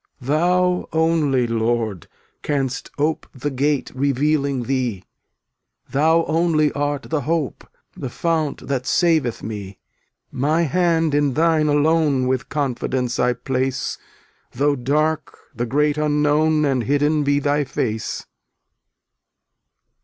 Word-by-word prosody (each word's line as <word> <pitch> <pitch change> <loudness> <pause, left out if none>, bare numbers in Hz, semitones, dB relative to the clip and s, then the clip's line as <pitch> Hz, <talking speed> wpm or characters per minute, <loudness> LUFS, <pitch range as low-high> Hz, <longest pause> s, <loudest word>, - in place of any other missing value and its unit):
302 135 +1 -3
Thou 180 +1 +1
only, 160 -6 +2
Lord, 115 -5 -1 0.3
canst 135 -3 -2
ope 150 +2 -1
The 145 +3 -3
gate 140 +2 0
revealing 140 0 0
Thee, 125 -7 -2 0.9
Thou 160 +4 +3
only 160 -2 +2
art 145 -1 -2
the 155 -2 -2
hope, 155 0 -2 0.3
The 130 - -5
fount 160 0 -1
that 130 -2 -2
saveth 160 -9 +1
me. 100 -3 -6 0.5
My 155 +6 +1
hand 165 0 +1
in 145 -2 +2
Thine 160 -1 +3
alone 150 -2 +2
With 130 0 -1
confidence 130 -2 -2
I 125 0 +3
place 130 0 -2 0.5
Though 145 +3 +2
dark 150 +4 -1 0.2
the 120 0 -3
great 150 +4 +1
Unknown 150 +1 +2
And 130 -5 0
hidden 145 +2 +2
be 145 0 +2
Thy 145 +1 +1
tace. 110 -4 -3
145 Hz, 115 wpm, -21 LUFS, 130-155 Hz, 0.9 s, Thou